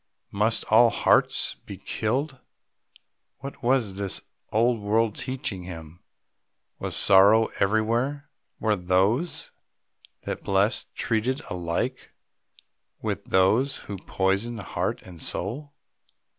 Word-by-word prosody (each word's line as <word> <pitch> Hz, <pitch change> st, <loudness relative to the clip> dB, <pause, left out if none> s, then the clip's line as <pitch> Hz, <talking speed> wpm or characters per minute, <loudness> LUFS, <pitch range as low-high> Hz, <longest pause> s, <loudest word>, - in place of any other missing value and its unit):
Must 105 Hz, +3 st, +1 dB
all 115 Hz, +2 st, +7 dB
hearts -, -, +3 dB
be -, -, -7 dB
killed? 135 Hz, +5 st, -2 dB, 1.0 s
What 140 Hz, +1 st, -9 dB
was 120 Hz, -5 st, +1 dB
this 100 Hz, -2 st, -1 dB, 0.3 s
old 115 Hz, +2 st, +2 dB
world 110 Hz, +1 st, +1 dB
teaching 125 Hz, -7 st, -4 dB
him? 85 Hz, -2 st, -9 dB, 0.8 s
Was -, -, -3 dB
sorrow 100 Hz, +4 st, +6 dB
everywhere? 115 Hz, +8 st, 0 dB, 0.3 s
Were 110 Hz, -1 st, +2 dB
those 95 Hz, -, 0 dB, 0.7 s
that -, -, -5 dB
blessed 100 Hz, +4 st, 0 dB
treated 125 Hz, +5 st, 0 dB
alike 85 Hz, -2 st, -3 dB, 0.9 s
with -, -, -3 dB
those 110 Hz, +9 st, +2 dB
who 100 Hz, -, -6 dB
poisoned 100 Hz, +6 st, -1 dB
heart 95 Hz, -, -3 dB
and 85 Hz, -3 st, -12 dB
soul? 135 Hz, +10 st, -4 dB
110 Hz, 105 wpm, -25 LUFS, 95-125 Hz, 1.0 s, all